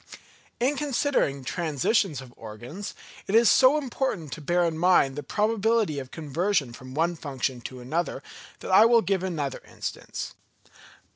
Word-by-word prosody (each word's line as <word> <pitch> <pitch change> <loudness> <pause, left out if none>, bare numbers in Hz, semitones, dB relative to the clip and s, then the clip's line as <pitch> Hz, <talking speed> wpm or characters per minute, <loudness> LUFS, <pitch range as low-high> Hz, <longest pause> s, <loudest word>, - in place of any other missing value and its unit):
In 270 +4 +1
considering 270 - 0
transitions 160 - 0
of 125 -2 -13
organs, 120 - -8 0.3
it 195 - 0
is 230 -1 +6
so 265 +3 +6
important 255 - -2
to 155 - -6
bear 175 +4 +2
in 165 -1 -1
mind 160 -5 +3
the 145 - -4
probability 215 -1 +1
of 130 -2 -8
conversion 160 -2 -1
from 130 +2 -10
one 170 +3 +1
function 135 -4 -3
to 125 +1 -8
another, 145 +1 -2 0.4
that - - -5
I 190 - +8
will 230 -1 +5
give 195 -2 0
another 160 -7 -3
instance. - - -6
170 Hz, 150 wpm, -26 LUFS, 135-215 Hz, 0.4 s, I